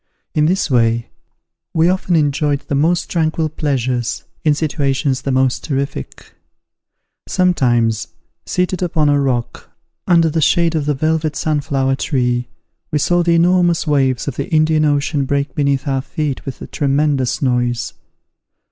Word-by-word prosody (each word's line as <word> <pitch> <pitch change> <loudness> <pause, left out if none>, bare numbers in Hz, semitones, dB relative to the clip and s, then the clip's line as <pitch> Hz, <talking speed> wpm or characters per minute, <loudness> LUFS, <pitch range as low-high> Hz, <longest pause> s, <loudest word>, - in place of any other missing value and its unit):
In 150 0 +2
this 180 -3 0
way, 115 -1 +2 0.7
we 160 +1 +4
often 185 -1 +1
enjoyed 145 -1 +1
the - - -6
most 165 +5 +1
tranquil 160 -1 0
pleasures 130 -6 -2 0.2
in 150 -2 +3
situations 140 -3 -1
the 135 - -2
most 130 -1 +1
terrific. 140 - -4 0.9
Sometimes, 120 - +1 0.4
seated 180 0 -1
upon 160 -4 +1
a 145 0 +3
rock, 125 -4 -2 0.4
under 170 -2 +4
the 160 +1 0
shade 170 +2 +3
of 150 -3 -1
the 150 - +1
velvet 155 +1 0
sunflower 140 -3 0
tree, 125 -4 0 0.4
we 150 - +1
saw 175 +4 +2
the 170 -1 +2
enormous 175 0 +3
waves 135 -4 +1
of 140 - -4
the - - -3
Indian 155 -1 +3
Ocean 145 0 +1
break 140 0 -1
beneath 140 -1 0
our 135 -1 0
feet 145 0 -4
with 135 - -6
a - - -5
tremendous 140 -2 0
noise. 120 -2 0
145 Hz, 145 wpm, -17 LUFS, 130-160 Hz, 0.9 s, we